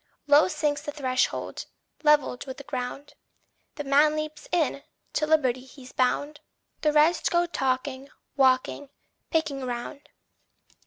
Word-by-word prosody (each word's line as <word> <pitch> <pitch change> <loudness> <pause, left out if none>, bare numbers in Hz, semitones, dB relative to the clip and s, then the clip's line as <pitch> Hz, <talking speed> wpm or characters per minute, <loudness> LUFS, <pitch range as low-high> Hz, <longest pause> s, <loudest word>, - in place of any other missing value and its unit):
Low 295 +1 +6
sinks 295 -5 -1
the 295 - -5
threshold, 255 -4 -1 0.3
levelled 295 -4 +2
with 260 - -6
the 280 - -9
ground; 265 +1 -5 0.6
The 295 - -4
man 290 +2 +4
leaps 310 -1 -5
in 320 -5 +1 0.3
to 305 - 0
liberty 260 -5 +2
he's 260 0 -14
bound. 285 +4 0 0.4
The 305 - +3
rest 305 +3 +3
go 345 0 +2
talking, 270 -3 -2 0.3
walking, 265 +1 +2 0.4
picking 295 -5 -1
round. 255 +4 -6
285 Hz, 125 wpm, -26 LUFS, 260-300 Hz, 0.6 s, Low